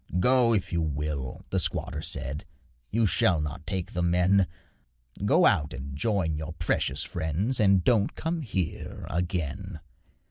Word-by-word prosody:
'Go 125 Hz, +3 st, +4 dB
if 95 Hz, -5 st, 0 dB
you 85 Hz, -, +1 dB
will,' 75 Hz, -3 st, -3 dB
the -, -, +2 dB
squatter -, -, -1 dB
said, 70 Hz, +3 st, -3 dB, 0.5 s
'You 115 Hz, +1 st, +2 dB
shall 90 Hz, -3 st, +3 dB
not 75 Hz, +2 st, -5 dB
take 95 Hz, -2 st, -3 dB
the 90 Hz, -, -1 dB
men 90 Hz, +2 st, +3 dB, 0.8 s
Go 165 Hz, -, +5 dB
out 75 Hz, -, +2 dB
and 70 Hz, 0 st, -7 dB
join 85 Hz, -3 st, 0 dB
your 80 Hz, 0 st, -5 dB
precious 80 Hz, -1 st, -1 dB
friends, 95 Hz, -, -2 dB
And 100 Hz, -3 st, +4 dB
don't 110 Hz, -3 st, +2 dB
come 165 Hz, +1 st, -2 dB
here 95 Hz, -, -3 dB
again.' 85 Hz, 0 st, -2 dB
90 Hz, 145 wpm, -27 LUFS, 75-100 Hz, 0.8 s, Go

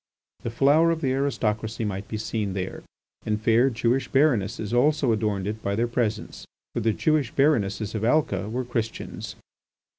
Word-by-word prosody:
The -, -, -3 dB
flower 145 Hz, +7 st, +4 dB
of 165 Hz, -1 st, 0 dB
the 135 Hz, -4 st, +1 dB
aristocracy 115 Hz, -5 st, -1 dB
might 100 Hz, +1 st, -4 dB
be 110 Hz, -, -4 dB
seen 105 Hz, -2 st, -2 dB
there, 95 Hz, -1 st, -4 dB, 0.4 s
and 105 Hz, -1 st, -1 dB
fair 115 Hz, +4 st, +4 dB
Jewish 125 Hz, +2 st, 0 dB
baronesses 120 Hz, -7 st, +1 dB
also 140 Hz, +1 st, +3 dB
adorned 105 Hz, -3 st, 0 dB
it 105 Hz, +2 st, -4 dB
by 100 Hz, -1 st, -1 dB
their 115 Hz, +3 st, +1 dB
presence, 115 Hz, -3 st, -2 dB, 0.3 s
for -, -, -1 dB
the 115 Hz, 0 st, +2 dB
Jewish 150 Hz, +2 st, +1 dB
baronesses 110 Hz, -8 st, +1 dB
of 110 Hz, -1 st, -3 dB
Alca 110 Hz, -6 st, +1 dB
were 125 Hz, +3 st, -2 dB
Christians. 115 Hz, -2 st, -4 dB
115 Hz, 160 wpm, -25 LUFS, 105-135 Hz, 0.4 s, flower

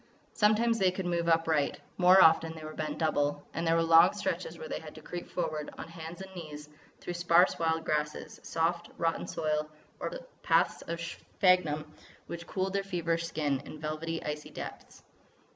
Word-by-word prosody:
Sometimes 225 Hz, +2 st, +3 dB
they 190 Hz, -, +4 dB
could 185 Hz, 0 st, -4 dB
move 170 Hz, -1 st, 0 dB
upright; 165 Hz, -3 st, +2 dB, 0.2 s
more 185 Hz, +1 st, +8 dB
often 160 Hz, 0 st, +4 dB
they 160 Hz, -, -9 dB
were 155 Hz, 0 st, -7 dB
bent 155 Hz, -1 st, -3 dB
double; 145 Hz, -2 st, 0 dB
and 165 Hz, +1 st, -2 dB
there 165 Hz, -, +4 dB
were 165 Hz, -, +3 dB
long 165 Hz, 0 st, +7 dB
stretches 175 Hz, -4 st, -3 dB
where 160 Hz, -, -7 dB
they -, -, -4 dB
had 155 Hz, -1 st, -11 dB
to 155 Hz, -, -10 dB
creep 175 Hz, +2 st, -6 dB
forward 155 Hz, -4 st, -3 dB
on -, -, -7 dB
hands 165 Hz, +2 st, -8 dB
and 190 Hz, 0 st, -12 dB
knees 150 Hz, -3 st, -8 dB, 0.3 s
through 175 Hz, -, -5 dB
sparse 175 Hz, +1 st, +4 dB
wild 160 Hz, -1 st, 0 dB
grasses, 150 Hz, 0 st, -2 dB
soft, 170 Hz, +1 st, -1 dB
rotten 165 Hz, -1 st, -1 dB
soil, 155 Hz, -1 st, -1 dB, 0.3 s
or -, -, -2 dB, 0.3 s
paths -, -, +2 dB
of 170 Hz, 0 st, -3 dB
sphagnum 170 Hz, -3 st, +1 dB, 0.3 s
which 170 Hz, 0 st, -7 dB
cooled 190 Hz, 0 st, -2 dB
their 200 Hz, -, +1 dB
feverish 170 Hz, -3 st, -1 dB
skin 145 Hz, -4 st, -1 dB
in 145 Hz, +2 st, -10 dB
velvety, 155 Hz, +2 st, -3 dB
icy 150 Hz, 0 st, -4 dB
depths. -, -, -9 dB
165 Hz, 175 wpm, -30 LUFS, 155-175 Hz, 0.3 s, more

